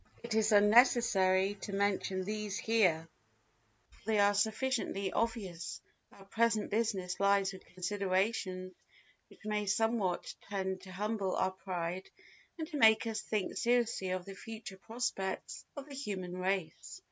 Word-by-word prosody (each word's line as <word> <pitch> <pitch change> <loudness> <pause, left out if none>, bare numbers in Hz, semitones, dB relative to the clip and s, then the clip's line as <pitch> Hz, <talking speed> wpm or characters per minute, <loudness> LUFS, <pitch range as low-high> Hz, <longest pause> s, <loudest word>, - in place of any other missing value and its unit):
It 235 -1 -3
is 220 0 +3
unnecessary 205 -3 +5
to 200 - -5
mention 195 -1 0
these 210 0 -3
here, 180 -8 +2 0.8
for - - -23
they 220 -1 +2
are 205 0 +5
sufficiently 220 -2 0
obvious; 200 -8 -2 0.3
our 195 - -16
present 225 +1 +1
business 200 -5 -1
lies 200 -1 +3
with 190 - -11
considerations 185 0 -1 0.6
which - - -18
may 210 -1 -1
somewhat 215 -3 0 0.2
tend 190 -2 -2
to 185 0 -11
humble 205 0 -1
our 185 - +1
pride 185 -1 -4 0.5
and 320 -2 -4
to 305 - -4
make 220 -4 +6
us 220 -1 -2
think 210 -3 -2
seriously 235 -5 +1
of 185 -1 -2
the 195 - -7
future 215 -1 -8
prospects 220 -4 -3
of 285 0 -6
the 285 - -10
human 195 -9 -4
race. 185 -2 -2
200 Hz, 140 wpm, -33 LUFS, 185-225 Hz, 0.8 s, make